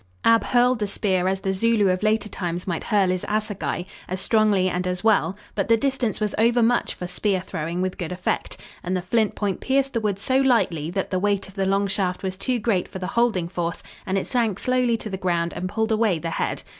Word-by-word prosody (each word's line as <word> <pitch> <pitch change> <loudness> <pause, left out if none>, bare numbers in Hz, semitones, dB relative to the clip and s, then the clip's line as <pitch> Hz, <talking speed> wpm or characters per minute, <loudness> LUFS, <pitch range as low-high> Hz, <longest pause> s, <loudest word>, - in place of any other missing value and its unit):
Ab 230 0 +5
hurled 245 0 +3
the 210 - 0
spear 190 -2 0
as 190 0 0
the 190 -1 0
Zulu 220 +1 +2
of 185 0 0
later 215 0 +1
times 175 -3 -3
might 170 -4 -3
hurl 200 -4 +2
his 185 0 -1
assagai, 210 -4 -2 0.2
as 185 +1 -3
strongly 205 -2 +3
and 180 0 -1
as 180 +1 -2
well, 195 -4 +3 0.2
but 195 - -1
the 230 - +5
distance 260 -4 -1
was 210 -2 -1
overmuch 235 +1 +3
for 180 - -6
spear 190 +2 0
throwing 175 0 -3
with 185 0 -3
good 175 -2 -3
effect, 180 0 -2 0.2
and 185 +1 -1
the 180 - -4
flint 220 +3 +1
point 200 -3 -2
pierced 270 0 +1
the 230 - 0
wood 205 -3 0
so 260 +6 +1
lightly 225 - +2
that 190 +2 -3
the 185 - +1
weight 200 0 0
of 190 - -14
the 195 -1 -1
long 195 +1 +2
shaft 190 -2 -1
was 190 -1 -2
too 250 +6 -1
great 205 -5 0
for - - -8
the 185 - -4
holding 205 -4 +1
force 170 -1 -3 0.2
and 190 +1 0
it 195 - -1
sank 230 -6 0
slowly 250 -1 +1
to 220 - -7
the 190 - -3
ground 170 -2 0
and 185 - -4
pulled 220 +3 -1
away 215 -5 +2
the 165 +1 -4
head. - - -2
195 Hz, 230 wpm, -23 LUFS, 185-225 Hz, 0.2 s, Ab